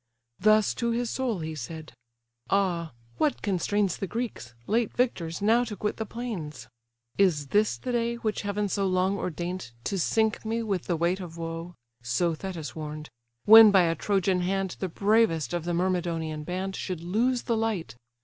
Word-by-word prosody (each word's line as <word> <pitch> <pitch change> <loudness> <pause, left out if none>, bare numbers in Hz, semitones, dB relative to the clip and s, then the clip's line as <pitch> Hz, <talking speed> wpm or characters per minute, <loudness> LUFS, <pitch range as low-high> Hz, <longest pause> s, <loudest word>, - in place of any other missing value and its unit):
Thus 215 +2 +4
to 235 - +1
his 235 0 -1
soul 240 -9 -1
he 160 0 -4
said: 155 +1 -7 0.6
"Ah! 175 -6 +1 0.3
what 300 - +1
constrains 200 -1 0
The 195 - -3
Greeks, 210 - -5
late 225 0 +1
victors, 195 -8 -1
now 230 +3 +4
to 215 -3 -6
quit 210 +2 -2
the 220 - -4
plains? 170 - -6 0.5
Is 155 -8 +2
this 210 +1 +2
the 255 - -4
day, 235 0 0
which 220 -2 -2
heaven 205 0 -1
so 195 0 0
long 185 +1 +2
ago 200 - -3
Ordain'd, 175 -6 -4
to 195 - -2
sink 220 +5 +1
me 225 +1 -1
with 195 -5 -2
the 175 - 0
weight 170 +3 +1
of 170 -3 -8
woe? 165 +1 -5 0.3
(So 165 +9 0
Thetis 165 -2 -6
warn'd;) 150 -1 -6 0.3
when 220 0 +10
by 195 -3 +5
a 165 -1 +2
Trojan 190 +1 +1
hand 190 0 -1
The 190 - -2
bravest 200 -4 +2
of 170 -2 -2
the 175 - -1
Myrmidonian 170 -4 -1
band 190 +2 -3
Should 180 -3 -4
lose 235 +8 +1
the 235 - 0
light! 220 - -2
190 Hz, 180 wpm, -27 LUFS, 165-215 Hz, 0.6 s, when